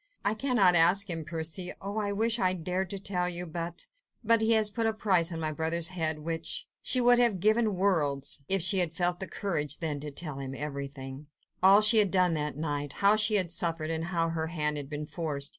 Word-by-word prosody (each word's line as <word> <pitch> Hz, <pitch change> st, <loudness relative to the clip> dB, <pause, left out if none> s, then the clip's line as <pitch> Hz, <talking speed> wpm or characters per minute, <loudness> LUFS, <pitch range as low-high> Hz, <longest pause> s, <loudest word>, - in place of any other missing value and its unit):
"I 205 Hz, -, +2 dB
cannot 220 Hz, -6 st, +2 dB
ask 180 Hz, +4 st, +5 dB
him, 165 Hz, -1 st, -3 dB
Percy.... 165 Hz, +3 st, -4 dB
Oh! 200 Hz, +2 st, -5 dB
I 205 Hz, -1 st, -2 dB
wish 225 Hz, +3 st, 0 dB
I 185 Hz, -2 st, +1 dB
dared 185 Hz, +1 st, -3 dB
to 200 Hz, -, -4 dB
tell 185 Hz, -2 st, -2 dB
you... 175 Hz, 0 st, -2 dB
but... 170 Hz, +1 st, -6 dB, 0.4 s
but... 230 Hz, 0 st, +3 dB
he 220 Hz, +1 st, +3 dB
has 215 Hz, -2 st, +3 dB
put 225 Hz, +1 st, -1 dB
a 220 Hz, -, 0 dB
price 185 Hz, -5 st, +1 dB
on 165 Hz, -, -5 dB
my 155 Hz, -1 st, -2 dB
brother's 160 Hz, +2 st, 0 dB
head, 160 Hz, -4 st, -1 dB
which.. 165 Hz, -, -4 dB
." -, -, -64 dB
She 255 Hz, -, +2 dB
would 245 Hz, 0 st, +4 dB
have 235 Hz, -6 st, +2 dB
given 215 Hz, +1 st, +1 dB
worlds 150 Hz, -8 st, 0 dB
if 195 Hz, -3 st, +5 dB
she 190 Hz, +1 st, +4 dB
had 170 Hz, -3 st, +2 dB
felt 175 Hz, +1 st, 0 dB
the 190 Hz, -, -4 dB
courage 150 Hz, -8 st, -2 dB
then 155 Hz, -4 st, -4 dB
to 150 Hz, +1 st, -7 dB
tell 145 Hz, -1 st, -6 dB
him 135 Hz, -1 st, -6 dB
everything... 140 Hz, -1 st, -7 dB, 0.3 s
all 195 Hz, +2 st, +6 dB
she 215 Hz, +1 st, +6 dB
had 205 Hz, -2 st, +3 dB
done 180 Hz, -2 st, +2 dB
that 150 Hz, -2 st, -3 dB
night—how 150 Hz, +6 st, 0 dB
she 215 Hz, 0 st, +3 dB
had 185 Hz, -4 st, +2 dB
suffered 165 Hz, -2 st, -2 dB
and 165 Hz, 0 st, -3 dB
how 170 Hz, -2 st, -1 dB
her 160 Hz, -1 st, -3 dB
hand 150 Hz, -2 st, -1 dB
had 140 Hz, -1 st, -6 dB
been 150 Hz, 0 st, -5 dB
forced. 150 Hz, -3 st, -4 dB
175 Hz, 225 wpm, -28 LUFS, 155-200 Hz, 0.4 s, all